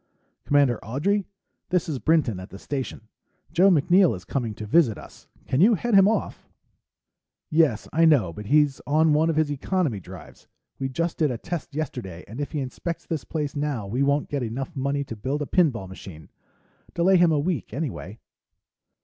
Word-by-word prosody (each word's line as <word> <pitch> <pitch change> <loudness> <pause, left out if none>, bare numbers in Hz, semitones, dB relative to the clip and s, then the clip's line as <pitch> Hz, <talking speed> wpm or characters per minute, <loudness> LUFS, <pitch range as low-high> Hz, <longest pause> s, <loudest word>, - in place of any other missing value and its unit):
"Commander 140 -5 +2
Audrey? 180 - -1 0.4
This 180 0 +1
is 145 -5 -3
Brinton 150 - +2
at 95 - -9
the 95 - -10
Station. 135 +3 -5 0.5
Joe 180 +4 +5
MacNeill 175 - +4
is 90 - -11
coming 115 -6 -3
to 110 - -7
visit 115 - +3
us. - - -14 0.2
Can 130 - +1
you 220 +4 +6
head 240 +5 -2
him 195 -1 +7
off?... 220 - -2 1.0
"Yes, 155 -8 +2
I 165 +1 +4
know, 130 - +4
but 105 +4 -8
he's 145 +1 +3
on 155 +2 +3
one 155 +2 +3
of 165 - 0
his 155 -1 +1
economy 145 - -1
drives. 90 -2 -13 0.3
We 135 - -2
just 165 +5 -2
did 155 -3 +3
a 125 - -3
test 170 +1 -6
yesterday 125 - -5
and 115 +7 -7
if 145 - -4
he 150 - -2
inspects 150 +6 -5
this 160 -3 -3
place 150 -3 -4
now, 145 -7 -2
we 115 +7 -2
won't 140 +1 +2
get 145 -2 -3
enough 130 +8 -4
money 140 +1 -1
to 115 - -7
build 135 +7 -2
a - - -4
pinball 135 - +1
machine. 90 -4 -11 0.6
Delay 185 +2 +4
him 175 -1 +5
a 155 - +2
week, 150 - -2
anyway.... 125 - -5
145 Hz, 185 wpm, -25 LUFS, 120-165 Hz, 1.0 s, him